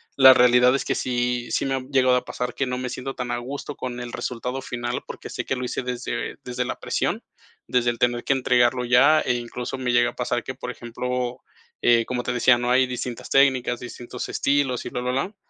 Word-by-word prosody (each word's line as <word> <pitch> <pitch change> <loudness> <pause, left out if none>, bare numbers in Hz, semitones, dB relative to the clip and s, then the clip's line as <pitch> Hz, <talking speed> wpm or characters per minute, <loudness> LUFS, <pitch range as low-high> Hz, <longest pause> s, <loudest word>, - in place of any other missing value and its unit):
la 130 -1 +9
realidad 125 +1 +5
es 140 - -1
que - - 0
sí 120 -1 -1
sí - - 0
me 135 0 0
ha - - -1
llegado 130 -2 +4
a 125 - 0
pasar 125 -1 -4
que 135 - 0
no 125 0 -3
me 125 0 -3
siento 135 +2 -5
tan 125 -1 -4
a 120 - -1
gusto 140 +3 -6
con 125 -1 -5
el 120 -1 -6
resultado 125 +2 -4
final, 120 -1 -4
porque - - -8
sé - - -4
que 130 - -1
lo 125 - -4
hice 125 - -3
desde 125 0 -4
desde 125 0 -3
la - - -4
presión, - - -1 0.4
desde 120 -1 +2
el 120 - -9
tener 120 0 +1
que 140 - +2
entregarlo 125 -1 +2
ya 140 +6 +5
e - - +1
incluso 120 +2 -5
me 130 -1 -1
llega - - +3
a - - -25
pasar - - -1
que, - - -6
por - - -6
ejemplo, 125 +1 -4 0.4
eh, 115 -1 +4
como 125 -1 -3
te 125 - -2
decía, 120 0 +4
no 120 0 -1
hay 130 0 +4
distintas 125 -1 -5
técnicas, 130 -3 +3
distintos 120 0 -7
estilos 140 -3 0
y - - -4
blablablá. 130 - -2
125 Hz, 225 wpm, -24 LUFS, 120-130 Hz, 0.4 s, la